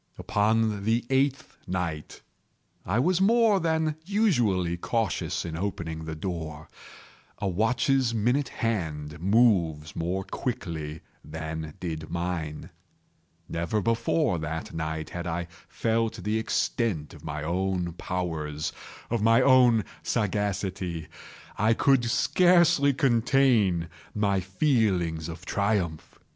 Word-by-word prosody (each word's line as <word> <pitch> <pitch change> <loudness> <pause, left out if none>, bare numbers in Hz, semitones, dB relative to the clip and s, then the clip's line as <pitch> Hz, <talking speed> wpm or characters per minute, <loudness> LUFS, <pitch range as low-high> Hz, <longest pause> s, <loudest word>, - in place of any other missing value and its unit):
Upon 105 0 +1
the 115 +3 +1
eighth 135 +2 +1
night 85 -5 -4 0.7
I 100 +5 +1
was 175 +8 +2
more 220 0 +4
than 160 -2 0
usually 120 - +1
cautious 110 0 -1
in 80 -2 -4
opening 80 -3 -4
the 80 0 -5
door. 80 -2 -5 0.7
A 100 - -2
watch's 120 +6 +2
minute 120 +5 +1
hand 80 -8 -3
moves 90 -7 +2
more 90 +3 -2
quickly 85 - -4 0.2
than 80 0 -6
did 80 -3 -5
mine. 85 -3 -4 0.8
Never 85 +6 -1
before 115 - +1
that 80 +1 -5
night 80 -1 -4
had 85 0 -5
I 85 0 -2 0.2
felt 115 0 -1
the 105 +2 0
extent 110 -7 -1
of 75 -2 -14
my 75 -1 -4
own 90 +1 -1
powers—of 85 +5 -4
my 115 0 +5 0.2
sagacity. 95 -5 -2 0.5
I 110 +2 +4
could 135 -2 +3
scarcely 175 +2 +4
contain 120 - +3 0.3
my 100 -2 +2
feelings 95 - +1
of 85 +2 -8
triumph. 100 -7 -1
95 Hz, 105 wpm, -27 LUFS, 80-120 Hz, 0.8 s, my